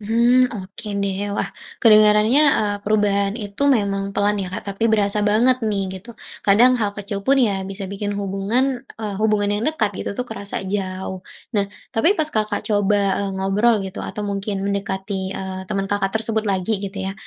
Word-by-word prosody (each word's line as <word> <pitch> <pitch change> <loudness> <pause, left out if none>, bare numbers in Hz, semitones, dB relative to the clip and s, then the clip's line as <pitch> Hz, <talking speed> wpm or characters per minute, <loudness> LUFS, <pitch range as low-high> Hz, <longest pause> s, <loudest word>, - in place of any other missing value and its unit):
Hmm, 235 +4 +3
oke 195 +3 -9 0.2
deh. 195 -1 -1 0.2
Wah, 195 - -1 0.3
kedengarannya, 215 +4 +6 0.2
eee, 205 -1 0
perubahan 205 -1 +1
itu 205 +1 -5
memang 200 -2 -1
pelan 205 0 +2
ya 190 - -3
Kak, 185 - -5
tapi 225 +4 0
berasa 210 -1 +2
banget 220 +5 +3
nih, 200 -2 0 0.2
gitu. 230 +3 -13 0.3
Kadang 235 +6 +6
hal 205 - +1
kecil 200 -1 -4
pun, 275 +1 +5
ya 205 -7 +2
bisa 195 0 -5
bikin 205 +1 -3
hubungan, 200 +5 0 0.3
eee, 210 -2 -4
hubungan 210 -1 +2
yang 205 +2 -1
dekat 225 -10 0
gitu - - -3
tuh 250 - -1
kerasa 205 -3 -6
jauh. 190 -1 -4 0.3
Nah, 200 -1 +2 0.3
tapi 225 +8 +3
pas 315 - +2
Kakak 215 -1 -1
coba, 205 -1 +2 0.2
e - - -1
ngobrol 200 +5 +2
gitu, 190 0 -6
atau 210 - -5
mungkin 200 0 -3
mendekati, 195 -1 -3
eee, 190 0 -5
teman 195 0 -1
Kakak 200 -1 0
tersebut 220 0 -1
lagi 190 +2 0
gitu 195 0 -5
ya, 195 - -3
205 Hz, 175 wpm, -21 LUFS, 195-220 Hz, 0.3 s, kedengarannya